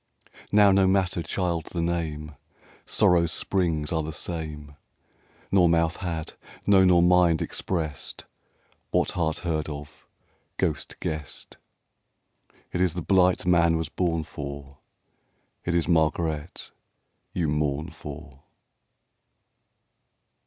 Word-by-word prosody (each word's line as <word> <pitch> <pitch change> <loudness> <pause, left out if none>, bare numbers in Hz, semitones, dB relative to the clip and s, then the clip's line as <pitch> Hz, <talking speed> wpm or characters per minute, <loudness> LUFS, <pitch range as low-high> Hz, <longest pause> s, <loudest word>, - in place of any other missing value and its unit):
Now 105 -1 +6
no 95 0 +4
matter,, 95 -2 +1
child, 85 -1 -2
the 85 - -4
name: 80 -3 -3 0.5
Sorrow's 85 -2 +3
springs 85 -6 0
a>e 80 -2 +1
the 80 - -4
same. 75 -3 -5 0.8
Nor 90 -3 +5
mouth 85 0 +2
had, 85 -4 -4 0.3
no 100 -2 +6
nor 90 -2 +5
mind, 90 -2 +4
expressed 80 -6 -4 0.6
What - - +1
heart 80 -2 -1
heard 80 -2 -1
of, 75 -1 -9 0.5
ghost - - -2
guessed: 75 -2 -5 1.2
It 90 - 0
is 90 -3 +2
the 90 - -3
blight 90 -1 +3
man 85 -2 +4
was 80 -2 -3
born 85 -2 0
for, 70 -1 -8 0.9
It 85 - 0
is 85 - +1
Margaret 80 -1 0 0.6
you 85 -3 -1
mourn 75 +2 -1
for. 75 -3 -10
85 Hz, 110 wpm, -26 LUFS, 75-90 Hz, 1.2 s, Now